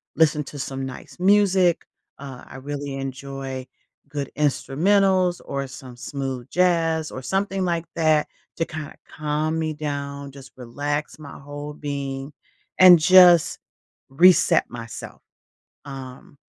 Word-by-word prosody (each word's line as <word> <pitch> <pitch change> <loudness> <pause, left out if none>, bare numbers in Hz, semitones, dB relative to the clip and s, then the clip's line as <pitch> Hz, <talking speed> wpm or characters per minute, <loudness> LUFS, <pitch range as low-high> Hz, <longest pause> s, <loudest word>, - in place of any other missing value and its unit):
listen 150 -2 +3
to 145 - -9
some 135 0 -4
nice 130 +6 -10
music, 190 -3 +3 0.3
uh, 135 -3 -9
I - - -10
really 140 0 -5
enjoy 135 -1 -6 0.4
good 140 -2 -5
instrumentals 180 +6 +2
or 140 -1 -3
some 130 -1 -11
smooth 135 -1 -5
jazz 165 -3 +1
or 130 - -7
something 195 +3 -1
like 170 -1 -1
that 155 -2 +2 0.3
to 165 - 0
kinda 155 -2 -8
calm 155 +2 -2
me 155 -1 -2
down, 140 -2 -5
just 135 -1 -13
relax 145 +6 -4
my 145 -2 -10
whole 145 +1 -8
being, 140 -1 -5 0.5
and 180 -3 +9
just 175 0 +6 0.5
reset 175 +6 +4
myself. 115 -1 -9 0.7
Um, 135 0 -10
145 Hz, 125 wpm, -23 LUFS, 135-165 Hz, 0.7 s, and